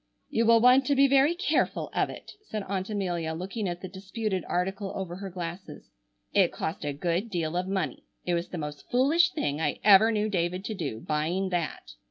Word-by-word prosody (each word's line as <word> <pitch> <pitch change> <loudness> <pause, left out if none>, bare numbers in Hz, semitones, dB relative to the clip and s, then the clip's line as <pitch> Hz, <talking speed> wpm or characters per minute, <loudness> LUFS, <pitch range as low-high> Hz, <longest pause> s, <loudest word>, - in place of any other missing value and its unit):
"You 230 0 +2
will 230 0 +7
want 250 +3 +5
to 285 - +3
be 275 +1 +6
very 275 +4 +4
careful 370 - 0
of - - +1
it," - - -9 0.2
said 215 -2 -4
Aunt 190 0 -3
Amelia, 175 -6 -2
looking 195 +4 -3
at 175 0 -5
the 185 - -5
disputed 190 +1 -3
article 195 +2 -2
over 180 -2 -4
her 195 0 -6
glasses, 175 0 -7 0.4
"it - - +4
cost 160 +2 -4
a 145 - -1
good 175 +9 -1
deal 170 -4 -2
of 180 +1 -1
money. 190 -9 -2 0.2
It 175 - 0
was 170 +1 -1
the 180 - -5
most 150 -2 -7
foolish 300 +8 +4
thing 150 - -2
I - - -1
ever 210 +2 +7
knew 215 -1 0
David 180 -1 -1
to 220 - -3
do, 145 - -4
buying 165 +6 -1
that." 165 - -3
190 Hz, 205 wpm, -28 LUFS, 170-215 Hz, 0.4 s, will